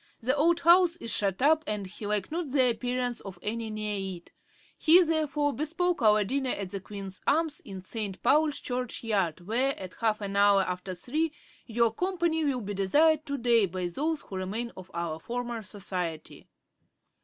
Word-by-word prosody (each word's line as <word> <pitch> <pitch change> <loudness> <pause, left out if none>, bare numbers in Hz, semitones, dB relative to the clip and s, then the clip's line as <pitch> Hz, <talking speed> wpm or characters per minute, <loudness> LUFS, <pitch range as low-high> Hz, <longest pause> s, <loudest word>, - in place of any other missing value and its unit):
The 255 +3 +1
old 335 +4 +3
house 345 0 +6
is 230 -9 -4
shut 200 +3 0
up, 315 +2 +4
and 210 -2 -2
he 205 +2 -7
liked 210 +1 -1
not 330 -2 -2
the 260 -2 +3
appearance 245 +1 -2
of 190 -3 -9
any 225 +1 -3
near 205 -3 -3
it; 170 - -19 0.4
he 340 +3 +6
therefore 300 -3 0
bespoke 335 +3 -1
our 215 -1 +5
dinner 265 +5 -1
at 195 -6 -3
the 200 - -3
Queen's 195 -1 -8
Arms, 315 0 +2
in 190 -2 -9
St. 200 -1 -4
Paul's 300 0 +3
Church 250 -1 -3
yard, 195 -7 0
where, 255 +7 0
at 185 -1 -7
half 220 -2 +2
an 200 -1 -4
hour 200 -1 +5
after 180 0 -4
three, 305 - -1 0.4
your 230 -1 +2
company 345 0 0
will 270 -4 0
be 205 -1 -4
desired 300 +11 +3
to 280 0 -2
day 235 -4 +3
by 185 0 -4
those 295 - -2
who 190 - -8
remain 215 +6 -3
of 185 0 -11
our 170 -2 -3
former 240 +3 -4
society. 185 -6 -5
230 Hz, 180 wpm, -28 LUFS, 195-290 Hz, 0.4 s, house